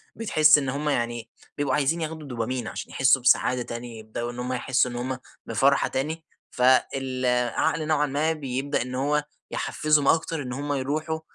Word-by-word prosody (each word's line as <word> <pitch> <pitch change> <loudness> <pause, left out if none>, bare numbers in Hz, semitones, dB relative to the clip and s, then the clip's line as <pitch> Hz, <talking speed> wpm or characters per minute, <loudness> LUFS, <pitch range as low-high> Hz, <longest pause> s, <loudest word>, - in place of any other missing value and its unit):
بتحس 155 -9 +5
إن 135 -3 -1
هُم 145 +3 -2
يعني 120 -3 -2 0.3
بيبقوا 145 -3 +1
عايزين 150 +3 +1
ياخدوا 160 -1 -5
دوبامين 125 -1 -3
عشان - - -6
يحسّوا 135 -1 +4
بسعادة 125 0 +3
تانية، 120 -1 -7
يبدؤوا 110 +2 -5
إن 120 - -9
هُم 125 +1 -2
يحسّوا 130 0 +1
إن - - -7
هُم 130 +2 -3 0.3
بفرحة 135 +5 +2
تاني، 155 +5 -3 0.3
فالعقل 130 +2 +1
نوعًا 150 -1 +2
ما 150 +3 0
بيبدأ 140 -1 -2
إن 125 +1 -4
هو 145 +3 +1 0.3
يحفزّهُم 150 -2 +1
أكتر 165 -1 +2
إن 125 -2 -5
هُم 145 +2 -3
يروحوا، 155 +4 -2
135 Hz, 165 wpm, -25 LUFS, 125-150 Hz, 0.3 s, بتحس